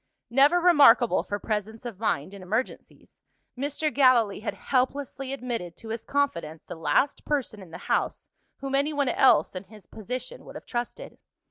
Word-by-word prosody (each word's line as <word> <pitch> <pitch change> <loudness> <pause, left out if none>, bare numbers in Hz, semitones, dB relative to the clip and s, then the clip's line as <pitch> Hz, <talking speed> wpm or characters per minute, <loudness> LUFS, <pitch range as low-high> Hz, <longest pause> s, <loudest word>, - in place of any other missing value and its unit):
Never 285 +8 +5
remarkable 290 -9 +6
for 205 - -4
presence 215 +2 -4
of 225 -6 -7
mind 185 -5 -1
in 200 - -10
emergencies, 215 +8 -5 0.3
Mr. 290 +3 -2
Gallilee 245 -7 +4
had 220 - -4
helplessly 270 0 -2
admitted 235 -10 -5
to 225 - -11
his 225 0 -5
confidence 170 - -2
the - - -8
last 170 - 0
person 265 -8 -2
in 185 - -12
the 165 - -8
house, - - -1 0.3
whom 275 0 -4
anyone 285 0 +1
else 265 - +4
(in 185 +2 -6
his 210 -1 -15
position) 250 - -7
would - - -12
have - - -9
trusted. 245 - -5
245 Hz, 160 wpm, -26 LUFS, 210-280 Hz, 0.3 s, remarkable